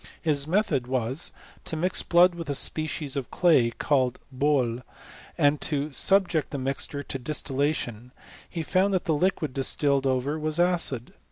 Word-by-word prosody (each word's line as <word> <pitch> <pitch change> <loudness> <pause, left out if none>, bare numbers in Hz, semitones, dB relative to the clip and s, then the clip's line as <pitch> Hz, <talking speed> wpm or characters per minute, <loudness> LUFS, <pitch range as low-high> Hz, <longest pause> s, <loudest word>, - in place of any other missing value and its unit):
His 150 -3 -1
method 160 - 0
was, 130 +3 -1 0.3
to - - -3
mix 180 +4 0
blood 175 +1 +4
with 165 -3 -7
a 140 - -1
species 155 -1 -2
of 135 -3 -4
clay, 155 -10 +3
called 130 +1 0 0.2
boUy 130 -4 +1 0.6
and 145 0 +2
to 150 0 -1
subject 180 0 +3
the 140 - -5
mixture 140 +2 -3
to 135 - -5
distillation, 130 -3 -2 0.4
He 165 -2 -4
found 190 +4 +1
that 185 - -1
the 165 - +1
liquid 155 -3 0
distilled 135 0 +2
ove? 130 -1 0
was 155 +2 -2
acid. 175 -9 +2
145 Hz, 155 wpm, -26 LUFS, 130-165 Hz, 0.6 s, blood